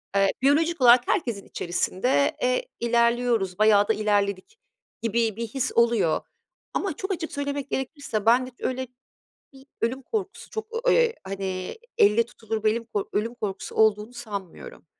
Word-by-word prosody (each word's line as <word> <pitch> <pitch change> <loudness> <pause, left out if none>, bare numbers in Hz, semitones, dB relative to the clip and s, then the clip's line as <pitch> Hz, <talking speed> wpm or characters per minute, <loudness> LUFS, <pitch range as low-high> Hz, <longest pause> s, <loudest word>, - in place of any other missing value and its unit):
eee, 195 -1 +4
biyolojik 315 +4 +2
olarak 245 0 +7
herkesin 235 - -1
içerisinde, 175 - 0
eee, 255 - +1
ilerliyoruz, 235 -4 +1
bayağı 210 -1 +5
da 220 - +3
ilerledik 205 - -1 0.4
gibi 230 -1 0
bir 230 +1 -4
his 255 +3 -2
oluyor. 230 -8 +3 0.5
Ama 390 -5 -1
çok 385 +5 -4
açık 335 -3 -3
söylemek 285 -1 -3
gerekirse 265 -5 -3
bende 250 +3 +4
hiç 245 - -30
öyle 260 0 -2 0.7
bir 270 0 -17
ölüm 255 +4 -1
korkusu, 395 - -5
çok, 440 0 -4 0.2
eee, 475 -1 +4
hani 190 - -4 0.2
elle 210 +3 +5
tutulur 220 -2 -5
belli 220 +2 +2
bir 230 - -16
kork 205 -3 -3
ölüm 225 +3 -1
korkusu 205 -5 -5
olduğunu 215 +1 +2
sanmıyorum. 205 -7 -8
235 Hz, 150 wpm, -25 LUFS, 205-260 Hz, 0.7 s, olarak